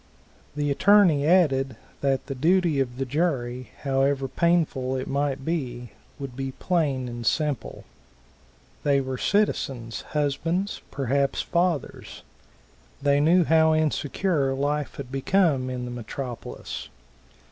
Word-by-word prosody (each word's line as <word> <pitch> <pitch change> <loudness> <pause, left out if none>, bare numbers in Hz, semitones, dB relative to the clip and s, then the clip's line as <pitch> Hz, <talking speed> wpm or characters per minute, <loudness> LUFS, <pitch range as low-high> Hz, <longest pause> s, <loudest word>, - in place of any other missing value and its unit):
The 145 -1 0
attorney 175 -3 +5
added 135 -8 +3 0.2
that 135 -2 0
the 135 - -4
duty 165 +2 +2
of 125 -2 -1
the 135 - -1
jury, 130 -4 -1
however 135 0 +1
painful 150 -5 +1
it 130 0 -3
might 140 -1 -1
be, 125 -8 -3 0.3
would 135 -3 -7
be 135 0 -4
plain 145 -8 0
and 120 -1 -6
simple. 150 +3 -1 1.0
They 140 -1 +3
were 130 -1 -4
citizens, 130 - 0
husbands, 165 +7 -1
perhaps 140 +1 0
fathers. 170 -4 -2 0.8
They 140 0 +3
knew 170 +5 +5
how 160 0 +4
insecure 150 -1 0
life 145 +1 -1
had 130 -3 -7
become 135 -2 +2
in 125 -1 -4
the 125 - -6
metropolis. 120 +1 -6
140 Hz, 120 wpm, -25 LUFS, 130-160 Hz, 1.0 s, attorney